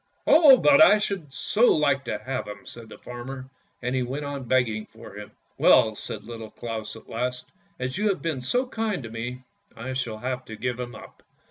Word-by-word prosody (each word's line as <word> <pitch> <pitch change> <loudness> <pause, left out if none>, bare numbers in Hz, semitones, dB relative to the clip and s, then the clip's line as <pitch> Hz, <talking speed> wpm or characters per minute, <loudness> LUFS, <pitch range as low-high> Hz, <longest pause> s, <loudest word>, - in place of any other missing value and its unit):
" - - -42
Oh, 300 -4 +8
but 290 +3 +7
I 215 - +7
should 195 -8 -3
so 210 - +3
like 140 -3 +1
to - - -2
have 130 +4 -4
him," 105 - -9
said 115 -2 -11
the - - -11
farmer, 130 +2 -8 0.4
and 125 +1 -1
he 130 - +1
went 135 +4 -3
on 140 -2 -5
begging 115 -4 +1
for 115 -2 -13
him. 105 0 -9 0.2
" - - -42
Well," - - +6
said - - -6
Little 115 -1 -8
Claus 115 -2 -6
at 110 - -14
last, 125 +2 -3 0.2
" - - -38
as 130 +6 -3
you 210 0 +2
have 195 - 0
been 160 -6 -3
so 245 - 0
kind 220 - -3
to 115 - -8
me 120 +3 -5 0.3
I 130 +3 -5
shall 120 -4 -3
have 130 +2 -4
to 110 - -8
give 125 +2 -3
him 120 -1 -5
up. - - -13
125 Hz, 225 wpm, -25 LUFS, 115-150 Hz, 0.4 s, Oh